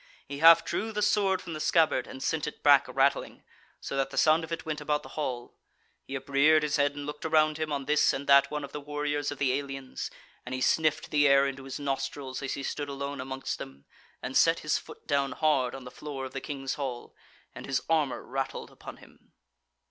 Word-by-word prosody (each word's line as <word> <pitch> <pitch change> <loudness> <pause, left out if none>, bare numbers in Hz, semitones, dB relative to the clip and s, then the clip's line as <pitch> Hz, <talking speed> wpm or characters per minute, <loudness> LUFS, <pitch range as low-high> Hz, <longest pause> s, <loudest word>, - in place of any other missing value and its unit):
He 140 0 -6
half 165 +1 +8
drew 220 +1 -2
the 210 -1 -1
sword 200 -3 +2
from 170 - -7
the 155 - -5
scabbard, 155 -5 +2
and 130 +1 -8
sent 160 -2 -1
it 150 - -8
back 145 -2 +6
rattling, 135 +1 0 0.4
so - - -5
that 135 0 0
the - - -9
sound 160 +1 +4
of 160 - -8
it 165 - -4
went 155 -1 -3
about 150 0 -1
the - - -11
hall; 125 -5 -4 0.5
he 135 - -6
upreared 140 +3 +3
his 150 0 0
head 145 0 +1
and 145 0 -6
looked 150 0 -7
around 155 -1 +2
him 155 -1 -2
on 140 -2 -2
this 150 +1 +3
and 135 +1 -4
that 140 0 +6
one 150 -1 -4
of 140 - -7
the 150 - -6
warriors 145 0 -2
of 145 - -6
the 130 -2 +1
aliens, 135 -1 -4 0.3
and 125 +1 -5
he - - -3
sniffed 155 +2 +1
the 145 -1 +4
air 140 0 +5
into 135 -1 -4
his 135 +1 -6
nostrils 135 -1 -3
as 140 - -3
he 140 - -6
stood 145 +1 -3
alone 140 0 -4
amongst 130 0 -4
them, 70 +1 -10 0.4
and 130 - -5
set 165 0 +4
his 155 - 0
foot - - -14
down 140 -2 0
hard 140 -5 +1
on 135 - -9
the 125 - -9
floor 140 -2 -6
of 130 - -7
the 135 - -4
King's 135 -3 -4
hall, 130 -4 -5 0.4
and - - -9
his 130 -2 -1
armour 155 -5 +1
rattled 135 +1 -4
upon - - -11
him. - - -20
145 Hz, 225 wpm, -28 LUFS, 135-155 Hz, 0.5 s, half